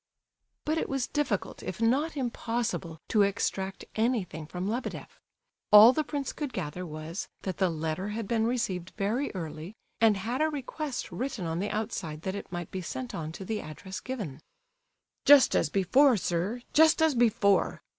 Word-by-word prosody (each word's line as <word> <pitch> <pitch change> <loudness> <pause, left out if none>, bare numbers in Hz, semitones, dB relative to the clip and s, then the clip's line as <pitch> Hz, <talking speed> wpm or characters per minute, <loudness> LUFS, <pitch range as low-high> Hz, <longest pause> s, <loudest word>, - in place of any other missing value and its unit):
But 315 +2 +1
it - - -3
was 270 -2 0
difficult, 270 -10 -2
if 185 - -6
not 280 +8 +1
impossible, 230 - -2
to 215 - +4
extract 195 -1 -1
anything 220 -9 -1
from 180 +3 -4
Lebedeff. 235 +5 -5 0.5
All 210 +4 +10
the 310 - 0
prince 285 -3 -3
could 290 -5 -4
gather 180 0 -4
was, 155 +4 -6 0.2
that 190 -2 -3
the 190 -2 +2
letter 160 +3 -3
had 210 0 -4
been 225 0 +1
received 190 -8 -2
very 225 +7 0
early, 165 +2 -6 0.2
and 220 -3 +5
had 235 +8 -2
a 315 - +3
request 290 -1 -4
written 250 -7 -3
on 165 +1 -2
the 205 +2 -1
outside 205 -8 -4
that 190 - -2
it 200 - -7
might 175 -2 -5
be 190 - -4
sent 130 -7 -5
on 155 -1 -4
to 190 - -7
the 215 +2 -2
address 185 +5 -7
given. 200 - -6 0.8
"Just 285 -2 +7
as 155 - +2
before, 230 - +4
sir, 190 +7 -2
just 315 +1 +6
as 320 -2 +4
before! 215 -5 +2
210 Hz, 170 wpm, -29 LUFS, 180-250 Hz, 0.8 s, All